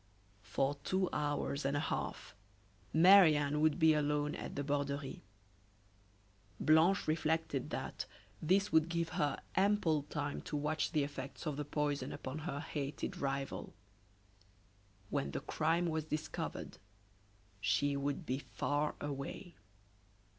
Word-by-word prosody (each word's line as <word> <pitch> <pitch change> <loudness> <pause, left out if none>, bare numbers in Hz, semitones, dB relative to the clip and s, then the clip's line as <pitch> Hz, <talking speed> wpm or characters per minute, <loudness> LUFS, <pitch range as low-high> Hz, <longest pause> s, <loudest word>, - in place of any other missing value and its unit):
For 135 +4 0
two 185 +2 +1
hours 145 -1 -1
and 140 +1 +1
a - - +1
half 155 - -3 0.6
Marie 175 -1 +8
Anne 145 +1 0
would 155 -1 +3
be 160 -2 +6
alone 150 0 +1
at - - -6
the 145 - -1
Borderie. 140 -1 -2 1.4
Blanche 160 +5 +4
reflected 155 -3 0
that - - -4 0.3
this 195 +5 +2
would 160 +1 +4
give 170 -1 -1
her 145 -2 0 0.2
ample 190 -6 +3
time 145 0 -4
to 150 - -4
watch 150 +1 0
the 150 -2 +2
effects 140 +2 -6
of 150 -3 -1
the 150 +1 -3
poison 145 -2 -1
upon 135 +4 -5
her 150 -2 -4
hated 145 -3 -4
rival. 135 -4 -3 1.4
When 140 -2 0
the - - -3
crime 165 +3 +1
was 160 -2 -1
discovered 155 0 -4 0.8
she 140 +9 +2
would 140 +4 -2
be 130 -1 -1
far 145 +1 -1
away. 145 +5 -5
150 Hz, 130 wpm, -35 LUFS, 140-160 Hz, 1.4 s, Marie